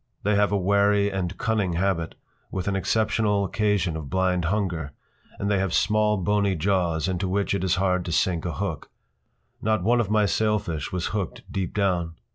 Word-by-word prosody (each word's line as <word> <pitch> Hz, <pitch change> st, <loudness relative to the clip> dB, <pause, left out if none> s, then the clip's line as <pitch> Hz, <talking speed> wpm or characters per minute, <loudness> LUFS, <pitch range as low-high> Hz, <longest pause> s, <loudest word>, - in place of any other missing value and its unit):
They 105 Hz, -, +2 dB
have 100 Hz, 0 st, +3 dB
a 100 Hz, -, +2 dB
wary 100 Hz, +1 st, +3 dB
and 95 Hz, -1 st, -3 dB
cunning 110 Hz, -7 st, 0 dB
habit, 85 Hz, -2 st, -1 dB, 0.3 s
with 95 Hz, 0 st, -4 dB
an 100 Hz, -, 0 dB
exceptional 105 Hz, 0 st, +1 dB
occasion 100 Hz, -4 st, 0 dB
of 75 Hz, -4 st, -6 dB
blind 90 Hz, -2 st, +1 dB
hunger, 85 Hz, -6 st, -1 dB, 0.4 s
and 100 Hz, -, -2 dB
they 100 Hz, -1 st, +2 dB
have 95 Hz, -3 st, 0 dB
small, 105 Hz, 0 st, +2 dB
bony 100 Hz, +1 st, +1 dB
jaws 85 Hz, -2 st, 0 dB
into 95 Hz, 0 st, -1 dB
which 100 Hz, +2 st, 0 dB
it 100 Hz, -, -1 dB
is 95 Hz, -1 st, +2 dB
hard 90 Hz, -1 st, +1 dB
to 85 Hz, -, -4 dB
sink 80 Hz, +2 st, +1 dB
a 85 Hz, -, -3 dB
hook. -, -, -4 dB, 0.7 s
Not 110 Hz, -4 st, +1 dB
one 120 Hz, +4 st, +3 dB
of 105 Hz, -, -3 dB
my 105 Hz, -1 st, +3 dB
sailfish 105 Hz, -7 st, -1 dB
was 90 Hz, -2 st, -2 dB
hooked 100 Hz, -5 st, -3 dB
deep 95 Hz, -3 st, -3 dB
down. 90 Hz, -5 st, 0 dB
95 Hz, 185 wpm, -25 LUFS, 90-105 Hz, 0.7 s, have